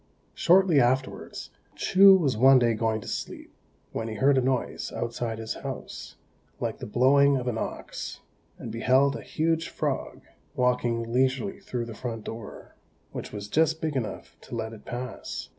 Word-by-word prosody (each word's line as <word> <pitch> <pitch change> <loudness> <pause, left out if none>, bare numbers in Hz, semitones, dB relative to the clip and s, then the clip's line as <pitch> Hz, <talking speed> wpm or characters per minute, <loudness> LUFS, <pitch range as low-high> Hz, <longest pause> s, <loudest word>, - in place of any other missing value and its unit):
Shortly 175 -3 +4
afterwards, 130 +1 -1 0.2
Chou 195 +1 +7
was 150 -10 +1
one 130 +4 +7
day 120 -2 +3
going 110 0 -1
to - - -11
sleep, - - -6 0.4
when 115 - -3
he 110 - -5
heard 135 +6 +4
a 130 - +3
noise 130 0 -1
outside 115 -1 -3
his 110 0 -4
house, - - -7 0.4
like - - -3
the - - -6
blowing 140 +5 +4
of 125 -1 -4
an 115 -2 -1
ox, - - -6 0.4
and 115 - -7
beheld 130 +5 +3
a - - -6
huge 165 +1 -1
frog - - -3 0.3
walking 120 -2 0
leisurely 130 +9 +1
through 125 -11 -4
the 115 - -8
front 115 -1 -5
door, 115 -2 -9 0.4
which - - -6
was 105 -1 -6
just 160 +7 +2
big 155 -3 -2
enough 110 -6 -4
to - - -8
let 110 -1 -4
it 105 - -13
pass. 125 +1 -6
125 Hz, 165 wpm, -27 LUFS, 115-140 Hz, 0.4 s, Chou